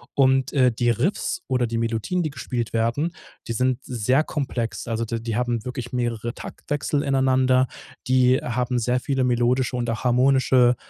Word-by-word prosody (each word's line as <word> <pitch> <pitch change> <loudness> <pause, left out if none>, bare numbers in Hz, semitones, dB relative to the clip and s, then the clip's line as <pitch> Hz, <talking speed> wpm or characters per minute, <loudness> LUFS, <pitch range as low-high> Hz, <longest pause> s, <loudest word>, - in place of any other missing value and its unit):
und, 135 -1 +3
äh, 130 -3 +4
die 120 +1 0
Riffs 125 - -1
oder 125 -2 +1
die 115 0 -3
Melodien, 115 +10 -1
die 155 - -2
gespielt 125 -3 -4
werden, 115 +9 0 0.3
die 115 - -2
sind 125 +2 +1
sehr 125 +4 +1
komplex. 125 -8 -3
Also, 115 0 -1
d 115 +1 -3
die 115 -1 -4
haben 120 -2 -1
wirklich 125 0 -6
mehrere 120 -2 -2
Taktwechsel 145 +1 -3
ineinander. 130 -1 +3 0.4
Die 130 0 +4
haben 125 +1 -1
sehr 125 +2 +1
viele 135 0 -1
melodische 125 +1 +1
und 120 -1 -2 0.2
harmonische, 125 0 +4
125 Hz, 160 wpm, -23 LUFS, 120-130 Hz, 0.4 s, äh